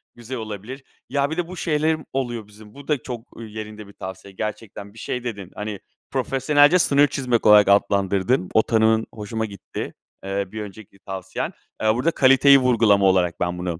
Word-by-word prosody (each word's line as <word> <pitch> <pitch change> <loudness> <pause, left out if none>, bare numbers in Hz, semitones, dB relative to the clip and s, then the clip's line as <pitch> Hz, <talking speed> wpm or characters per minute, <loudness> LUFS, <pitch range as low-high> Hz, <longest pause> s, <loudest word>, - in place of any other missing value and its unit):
güzel 120 +2 -7
olabilir. 110 +5 -7 0.3
Ya, 140 0 0
bir 160 - -3
de 175 - -1
bu 185 +1 -9
şeylerim 155 -1 0
oluyor 120 -5 -3
bizim. 105 0 -16
Bu 140 0 -13
da 150 - +2
çok 120 -2 -7
yerinde 110 -2 -8
bir 100 - -15
tavsiye 95 +1 -9
gerçekten 100 0 -6
bir 110 - -13
şey 125 +2 -4
dedin. 100 -6 -6
Hani, 105 -1 -5 0.3
"profesyonelce 145 +5 +3
sınır 145 -2 +4
çizmek" 125 -5 -1
olarak 105 -1 +7
adlandırdın. 100 +1 +2
O 110 - +6
tanımın 110 0 +2
hoşuma 110 +1 -4
gitti, 100 -3 -7 0.3
eee, 100 +1 -2
bir 110 0 -5
önceki 100 -1 -11
tavsiyen. 95 -1 -5 0.3
Aaa, 110 0 +2
burada 145 +8 +1
kaliteyi 135 0 +6
vurgulama 115 -6 +3
olarak 90 -2 +2
ben 90 0 -1
bunu, 90 -1 -4
110 Hz, 175 wpm, -22 LUFS, 100-130 Hz, 0.3 s, olarak